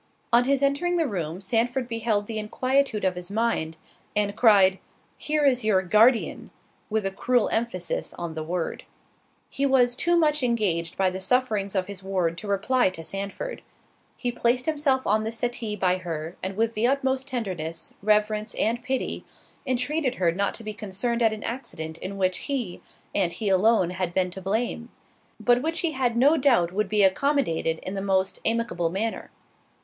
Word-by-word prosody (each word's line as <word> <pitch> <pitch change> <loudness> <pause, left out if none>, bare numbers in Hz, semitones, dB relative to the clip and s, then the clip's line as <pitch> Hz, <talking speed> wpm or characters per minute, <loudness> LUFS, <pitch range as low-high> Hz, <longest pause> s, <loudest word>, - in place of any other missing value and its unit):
On 240 +1 +5
his 275 +1 +1
entering 350 +6 +1
the 330 - +2
room 175 - -4
Sandford 240 +5 0
beheld 225 -3 0
the 220 0 -4
inquietude 255 +1 0
of 185 - +2
his 180 0 -5
mind, 205 -7 -1 0.4
and 205 -1 +1
cried, 195 -5 +5 0.4
"Here 300 -1 0
is 255 -3 +3
your 200 -3 +3
Guardian," 225 +6 +3 0.4
with 215 -2 0
a 195 - 0
cruel 245 +4 +1
emphasis 185 -7 -2
on 170 -2 -5
the 160 - -4
word. 170 +1 -3 0.6
He 275 - -4
was 255 -3 +4
too 345 +6 +2
much 305 -2 +2
engaged 195 -9 0
by 190 -1 +2
the 185 - -5
sufferings 210 -3 0
of 185 -1 +1
his 200 -1 -7
ward 185 -4 -1
to 210 - -8
reply 200 +4 +2
to 165 -3 -7
Sandford. 200 - -5 0.6
He 245 - -2
placed 240 +1 +1
himself 290 -4 +1
on 215 +2 +2
the 220 - -2
settee 230 -2 -2
by 185 -2 +1
her, 165 -2 -5
and 190 +1 -4
with 225 +1 +1
the 225 +2 +1
utmost 265 0 0
tenderness, 185 - -4
reverence, 210 +1 +1
and 235 +2 0
pity, 260 0 -2 0.4
entreated 260 +2 0
her 175 -3 +2
not 200 +4 -1
to 230 - -8
be 215 0 -5
concerned 210 +4 -2
at 225 -1 +4
an 215 -1 -6
accident 160 -10 -5
in 195 +1 -6
which 185 -1 +1
he, 245 -11 -3 0.3
and 180 -4 +1
he 215 -3 -1
alone, 190 -1 +3
had 185 -1 -3
been 185 -1 +1
to 190 - -7
blame; 230 +4 -2 0.5
but 245 0 +3
which 325 +3 -1
he 335 - 0
had 250 -5 0
no 285 +6 +5
doubt 240 - +3
would 200 +1 -1
be 210 0 +3
accommodated 190 - +1
in 185 - -4
the 195 - -3
most 190 -1 0
amicable 225 -7 +1
manner. 215 +6 -3
215 Hz, 180 wpm, -25 LUFS, 190-250 Hz, 0.6 s, On